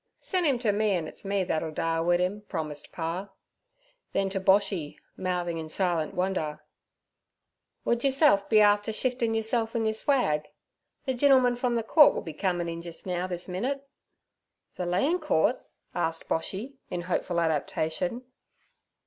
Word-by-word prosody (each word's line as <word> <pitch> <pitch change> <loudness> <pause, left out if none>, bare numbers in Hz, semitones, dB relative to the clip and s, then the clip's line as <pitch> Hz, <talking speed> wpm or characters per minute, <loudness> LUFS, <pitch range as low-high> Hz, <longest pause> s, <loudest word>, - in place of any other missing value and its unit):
'Sen' 365 -2 -1
'im 270 -3 +3
ter 235 -3 +1
me, 210 0 +1
an' 165 -3 -2
it's - - -9
me 200 -1 0
that'll 160 -2 -1
dale 165 +1 -1
wid 175 +1 +3
'im' 185 +3 -1
promised 155 -4 -4
pa. 175 +4 -4 0.8
Then 195 0 +1
to 195 - -1
Boshy, 190 -5 +2 0.2
mouthing 175 -2 -2
in 160 -1 -6
silent 170 -3 0
wonder: 180 -5 -1 1.3
'Wud 235 0 +1
yourself 270 -7 +4
be 220 - +5
afther 205 +1 +4
shiftin' 240 -1 0
yerself 225 +1 0
an' 225 -1 +1
yer 220 - +1
swag? 215 - +1 0.6
The 260 - 0
gintleman 255 -1 +4
from 245 0 0
ther 230 - 0
Coort 295 +6 +6
will - - -3
be 160 - -7
comin' 175 0 -1
in 170 0 -4
jis 170 -1 -9
now 180 -1 -2
this 175 -1 -4
minit.' 260 +10 -3 0.9
'Ther 180 - -4
Lan' 270 - +2
Coort?' - - +1 0.3
asked 165 -1 -2
Boshy, 210 +11 -3
in 175 - -3
hopeful 175 0 -1
adaptation. 160 - -1
190 Hz, 155 wpm, -28 LUFS, 170-230 Hz, 1.3 s, Coort